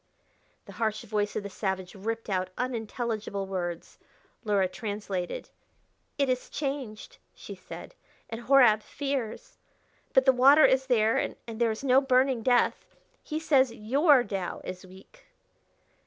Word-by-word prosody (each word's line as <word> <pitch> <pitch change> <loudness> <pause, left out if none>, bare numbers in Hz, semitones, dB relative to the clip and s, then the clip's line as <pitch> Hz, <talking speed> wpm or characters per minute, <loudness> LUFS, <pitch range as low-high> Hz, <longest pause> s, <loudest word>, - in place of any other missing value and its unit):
The - - -11
harsh 220 -1 0
voice 210 -1 -2
of - - -2
the 200 - -6
savage 190 -2 -3
ripped 225 +3 -4
out 185 -2 -1
unintelligible 225 -4 -3
words. 175 -3 -5 0.4
Luhra 200 -4 +2
translated. 200 -2 -5 0.7
"It 280 -1 +2
is 255 -1 -2
changed," 275 - -5 0.2
she - - -9
said, - - -10 0.3
"and 225 +1 -6
Horab 240 -4 +5
fears. 275 -3 -5 0.5
But 265 - +4
the 265 - +6
water 275 +5 +7
is 265 0 +2
there, 225 -3 +3
and - - -3
there 230 0 -1
is 220 +4 -4
no 265 0 +5
burning 260 -2 +2
death.... 245 +1 +1 0.3
He 310 0 -4
says 270 -5 +3
your 265 +5 +3
Tao 195 -5 -4
is 185 +1 -8
weak." 190 - -17
225 Hz, 140 wpm, -28 LUFS, 205-265 Hz, 0.7 s, water